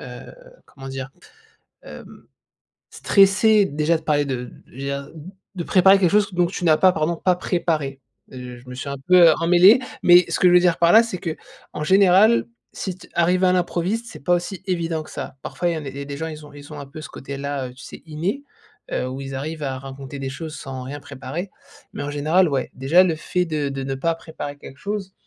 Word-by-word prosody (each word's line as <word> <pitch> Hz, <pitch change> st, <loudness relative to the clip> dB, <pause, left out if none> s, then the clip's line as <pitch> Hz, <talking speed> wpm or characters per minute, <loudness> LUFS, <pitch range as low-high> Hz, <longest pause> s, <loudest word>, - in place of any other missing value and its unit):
heu, -, -, -9 dB, 0.5 s
comment 135 Hz, -1 st, -11 dB
dire, 135 Hz, 0 st, -6 dB, 0.7 s
hem, -, -, -12 dB, 0.7 s
stressés 200 Hz, +2 st, +4 dB
déjà 155 Hz, 0 st, 0 dB
de -, -, -16 dB
parler 145 Hz, -1 st, +1 dB
de 125 Hz, -2 st, -4 dB, 0.2 s
je -, -, -24 dB
veux 130 Hz, -, -14 dB
dire, 140 Hz, +1 st, -4 dB, 0.5 s
de 175 Hz, -, -3 dB
préparer 190 Hz, +1 st, +5 dB
quelque 180 Hz, -3 st, +2 dB
chose 210 Hz, 0 st, +3 dB
que -, -, -12 dB
donc 175 Hz, -1 st, +2 dB
tu 180 Hz, -, -4 dB
n'as 155 Hz, -1 st, +5 dB
pas 185 Hz, -1 st, +5 dB
pardon, 160 Hz, +1 st, -1 dB
pas 180 Hz, +2 st, +1 dB
préparé, 160 Hz, -7 st, -2 dB, 0.3 s
heu, 125 Hz, -1 st, -9 dB
je 125 Hz, +1 st, -17 dB
me 125 Hz, -, -8 dB
suis 135 Hz, +2 st, -6 dB
un 140 Hz, -, -4 dB
peu 180 Hz, -3 st, +7 dB
emmêlé 180 Hz, +7 st, +6 dB, 0.2 s
mais 175 Hz, 0 st, +7 dB
ce -, -, -1 dB
que 180 Hz, -, +6 dB
je 175 Hz, -, +4 dB
veux -, -, +9 dB
dire 175 Hz, -2 st, +2 dB
par 170 Hz, 0 st, +4 dB
là, 225 Hz, -, +8 dB
c'est 225 Hz, -6 st, -5 dB
que 165 Hz, -2 st, -4 dB, 0.4 s
en 150 Hz, -, -3 dB
général, 195 Hz, +6 st, +4 dB, 0.2 s
si 190 Hz, -, -5 dB
t -, -, -16 dB
arriver 180 Hz, +2 st, +2 dB
à -, -, +3 dB
l'improviste, 185 Hz, +5 st, -1 dB
c'est -, -, -11 dB
pas 175 Hz, -, +3 dB
aussi 180 Hz, +2 st, -4 dB
évident 170 Hz, -3 st, -2 dB
que -, -, -14 dB
ça. -, -, -7 dB
Parfois, 175 Hz, -, -2 dB
il -, -, -1 dB
y -, -, -4 dB
en 150 Hz, -, -7 dB
a -, -, -5 dB
il 135 Hz, +1 st, -8 dB
y -, -, -4 dB
a -, -, -6 dB
des 140 Hz, -, -6 dB
gens, 160 Hz, +1 st, -3 dB
ils 155 Hz, -1 st, -9 dB
ont, -, -, -15 dB
ils 145 Hz, +1 st, -12 dB
ont 150 Hz, -, -7 dB
un 140 Hz, -, -8 dB
peu 140 Hz, +3 st, -10 dB
ce -, -, -8 dB
côté 140 Hz, +1 st, -8 dB
là, 140 Hz, -2 st, -3 dB
heu, 125 Hz, -, -13 dB
tu 130 Hz, -, -14 dB
sais -, -, -11 dB
inné, 170 Hz, -, -3 dB, 0.5 s
heu, 125 Hz, -, -1 dB
où 130 Hz, +2 st, -6 dB
ils 135 Hz, 0 st, -6 dB
arrivent 155 Hz, +3 st, -5 dB
à 135 Hz, -1 st, -3 dB
raconter 135 Hz, +1 st, -9 dB
des 135 Hz, -, -4 dB
choses 155 Hz, +3 st, -7 dB
sans 135 Hz, -3 st, -7 dB
rien 145 Hz, +3 st, -6 dB
préparer 145 Hz, +7 st, -7 dB, 0.4 s
mais -, -, -5 dB
en 145 Hz, -, -4 dB
général, 155 Hz, +5 st, +2 dB
ouais, 135 Hz, -3 st, -2 dB
déjà 145 Hz, +8 st, +4 dB
le 170 Hz, -3 st, 0 dB
fait 180 Hz, +3 st, -1 dB
de 150 Hz, -3 st, -2 dB
de 135 Hz, 0 st, -4 dB
ne 135 Hz, -, -3 dB
pas 165 Hz, +5 st, 0 dB
préparer 160 Hz, -3 st, -8 dB
quelque 135 Hz, -1 st, -12 dB
chose, 200 Hz, -2 st, -5 dB
160 Hz, 240 wpm, -22 LUFS, 140-180 Hz, 0.7 s, veux